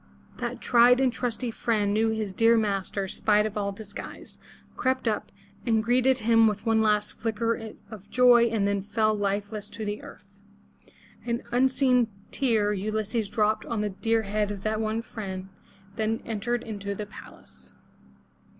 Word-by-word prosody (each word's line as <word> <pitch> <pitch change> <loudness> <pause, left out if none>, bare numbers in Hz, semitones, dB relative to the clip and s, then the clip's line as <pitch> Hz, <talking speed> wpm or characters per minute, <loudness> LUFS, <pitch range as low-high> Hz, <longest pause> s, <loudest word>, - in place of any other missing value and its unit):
That - - -4
tried 245 +1 +5
and 260 -2 +2
trusty 245 -1 -3
friend 210 -3 0
knew 220 +1 +2
his 215 -3 -2
dear 230 +3 +4
master 200 -2 -1
spite 210 +2 +2
of 215 - -4
all 200 -1 -1
disguise, 205 0 -9 0.4
crept 260 -1 0
up, 215 -2 -1 0.3
and 225 -2 +2
greeted 250 +2 +3
him 225 -1 +4
with 210 +1 -2
one 225 -1 +3
last 210 -1 +1
flicker 225 0 -2 0.2
of 205 -2 -11
joy 245 -2 +6
and 220 -3 +1
then 200 -1 0
fell 215 +2 +1
lifeless 205 +1 -2
to 220 - -6
the 205 0 -3
earth. 200 0 -14 0.8
An 235 0 -2
unseen 255 -1 +3 0.2
tear 220 -6 +1
Ulysses 215 +2 -2
dropped 215 0 +1
on 230 -3 -2
the 210 -1 -1
dear 225 +3 0
head 210 0 -1
of 200 -2 -6
that 215 0 -1
one 220 +1 -1
friend, 190 -5 -6 0.5
then 220 +1 -1
entered 230 +2 -2
into 200 -2 -5
the 210 - -5
palace. 65 - -14
220 Hz, 160 wpm, -27 LUFS, 205-230 Hz, 0.8 s, joy